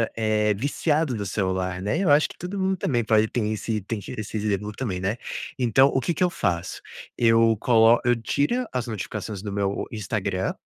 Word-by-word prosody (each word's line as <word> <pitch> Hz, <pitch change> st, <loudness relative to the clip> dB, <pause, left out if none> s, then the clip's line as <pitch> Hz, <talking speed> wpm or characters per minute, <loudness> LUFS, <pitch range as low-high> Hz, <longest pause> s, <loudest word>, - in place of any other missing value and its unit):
eh, 110 Hz, -1 st, +1 dB
viciado 145 Hz, +4 st, 0 dB
no 105 Hz, -2 st, -3 dB
celular, 95 Hz, -1 st, -2 dB
né? 105 Hz, -, -1 dB
Eu 195 Hz, -, +1 dB
acho 145 Hz, +2 st, +5 dB
que -, -, -13 dB
todo 180 Hz, +3 st, -5 dB
mundo 190 Hz, 0 st, +1 dB
também 120 Hz, -8 st, 0 dB
pode 110 Hz, -1 st, +3 dB
tem 110 Hz, -2 st, -1 dB
esse 110 Hz, 0 st, -2 dB
tem 105 Hz, +3 st, -4 dB, 0.2 s
esse 110 Hz, 0 st, -4 dB
exemplo 105 Hz, 0 st, -1 dB
também, 105 Hz, -5 st, -4 dB
né. 100 Hz, +5 st, -1 dB, 0.4 s
Então 130 Hz, +2 st, +4 dB
o 130 Hz, -, +1 dB
que 170 Hz, -, -1 dB
que 185 Hz, -, +1 dB
eu 180 Hz, -, +3 dB
faço: 90 Hz, -, -2 dB, 0.4 s
eu 115 Hz, -1 st, +4 dB
colo 115 Hz, 0 st, +5 dB
eu 120 Hz, 0 st, +3 dB
tira 145 Hz, -, 0 dB
as 125 Hz, -1 st, -2 dB
notificações 105 Hz, -2 st, -5 dB
do 105 Hz, -, -4 dB
meu 100 Hz, 0 st, -1 dB
Instagram 100 Hz, -3 st, -2 dB
110 Hz, 190 wpm, -24 LUFS, 100-125 Hz, 0.4 s, acho